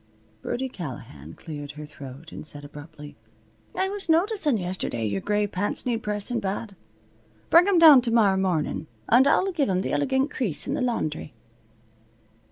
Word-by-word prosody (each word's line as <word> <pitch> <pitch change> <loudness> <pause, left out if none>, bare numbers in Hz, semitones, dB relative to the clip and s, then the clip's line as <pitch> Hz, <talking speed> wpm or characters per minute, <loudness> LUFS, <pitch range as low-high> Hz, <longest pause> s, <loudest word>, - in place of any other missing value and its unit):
Birdie 265 +2 -3
Callahan 115 - -9
cleared 145 -2 -8
her 150 0 -8
throat 145 +1 -11
and - - -8
said 145 -1 -6
abruptly: 145 0 -11 0.6
"I 380 - +1
was 395 -2 -6
noticin' 330 - +2
yesterday 180 - -2
your 100 -2 -2
gray 210 0 +1
pants 200 +1 -3
needs 235 -2 -1
pressin' 210 +3 -2
bad. 200 +1 -4 0.8
Bring 345 +3 +7
'em 395 -3 +3
down 310 -6 +9
tomorrow 230 -5 +3
mornin' 175 -4 -1 0.2
and 255 +4 +6
I'll 385 +6 +3
give 305 - 0
'em 185 0 0
th' - - -3
elegant 270 0 +1
crease 200 - -2
in - - -2
the - - -1
laundry." 160 - -2
205 Hz, 160 wpm, -25 LUFS, -, 0.8 s, down